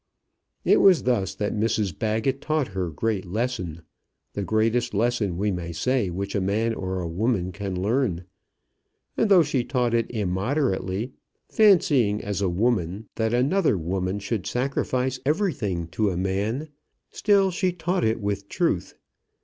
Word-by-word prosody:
It -, -, +5 dB
was 190 Hz, -4 st, +6 dB
thus 100 Hz, -6 st, 0 dB
that 105 Hz, +1 st, -2 dB
Mrs 105 Hz, -5 st, 0 dB
Baggett 110 Hz, +5 st, 0 dB
taught 155 Hz, -5 st, 0 dB
her 95 Hz, -2 st, -3 dB
great 100 Hz, +5 st, -1 dB
lesson, 95 Hz, -5 st, -3 dB, 0.5 s
the 100 Hz, -, -3 dB
greatest 115 Hz, +2 st, +1 dB
lesson 105 Hz, -5 st, 0 dB
we 105 Hz, +2 st, 0 dB
may 85 Hz, -2 st, -4 dB
say 115 Hz, +4 st, 0 dB
which 100 Hz, +3 st, -4 dB
a 100 Hz, -, 0 dB
man 110 Hz, +4 st, 0 dB
or 95 Hz, -3 st, -3 dB
a 85 Hz, -, -3 dB
woman 95 Hz, +1 st, 0 dB
can 95 Hz, -1 st, -4 dB
learn. 100 Hz, -4 st, 0 dB, 0.9 s
And 220 Hz, -, +1 dB
though 185 Hz, -4 st, +7 dB
she 140 Hz, -4 st, 0 dB
taught 125 Hz, -2 st, 0 dB
it 115 Hz, -1 st, +1 dB
immoderately, 105 Hz, +1 st, -1 dB, 0.4 s
fancying, 145 Hz, -, +4 dB
as 100 Hz, -2 st, -3 dB
a 95 Hz, -, +1 dB
woman, 100 Hz, 0 st, 0 dB
that 110 Hz, -1 st, -1 dB
another 140 Hz, -, +2 dB
woman 90 Hz, +3 st, -2 dB
should 100 Hz, -1 st, -3 dB
sacrifice 130 Hz, 0 st, -1 dB
everything 135 Hz, -, 0 dB
to 105 Hz, +4 st, 0 dB
a 90 Hz, -, -3 dB
man, 100 Hz, -, -1 dB, 0.4 s
still 200 Hz, -2 st, +3 dB
she 180 Hz, +1 st, 0 dB
taught 180 Hz, +1 st, -1 dB
it 110 Hz, +1 st, +1 dB
with 100 Hz, -1 st, -3 dB
truth. 165 Hz, -, -1 dB
110 Hz, 150 wpm, -25 LUFS, 95-130 Hz, 0.9 s, though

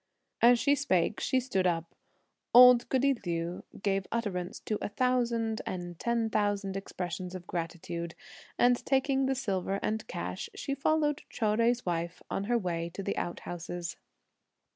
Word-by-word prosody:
As 240 Hz, +1 st, +7 dB
she 285 Hz, +4 st, +3 dB
spake, 210 Hz, -9 st, +1 dB
she 260 Hz, -, +2 dB
stood 195 Hz, -8 st, 0 dB
up. 165 Hz, -1 st, -1 dB, 0.6 s
Old 250 Hz, -1 st, +9 dB
goody 275 Hz, +1 st, +3 dB
Liu 170 Hz, 0 st, -3 dB, 0.2 s
gave 195 Hz, -1 st, 0 dB
utterance 195 Hz, -6 st, -2 dB
to 215 Hz, -, -2 dB
a -, -, -2 dB
thousand 235 Hz, -2 st, +1 dB
and 175 Hz, -2 st, -5 dB
ten 235 Hz, -1 st, +1 dB
thousand 205 Hz, -2 st, 0 dB
expressions 180 Hz, -1 st, -5 dB
of 180 Hz, -1 st, -7 dB
gratitude, 170 Hz, -1 st, -4 dB, 0.4 s
and 245 Hz, 0 st, +4 dB
taking 270 Hz, 0 st, +2 dB
the 265 Hz, -, +1 dB
silver 195 Hz, -6 st, -1 dB
and 220 Hz, +1 st, -2 dB
cash, 90 Hz, +2 st, -4 dB
she 275 Hz, -, -3 dB
followed 295 Hz, +1 st, +1 dB
Chou 225 Hz, -, -2 dB
Jui's 230 Hz, +3 st, +2 dB
wife 170 Hz, 0 st, -2 dB
on 195 Hz, -, -1 dB
her 240 Hz, +2 st, +2 dB
way 170 Hz, -5 st, -2 dB
to 195 Hz, -, -4 dB
the -, -, -2 dB
out 175 Hz, -, -3 dB
houses. 175 Hz, 0 st, -5 dB
205 Hz, 155 wpm, -30 LUFS, 175-245 Hz, 0.6 s, Old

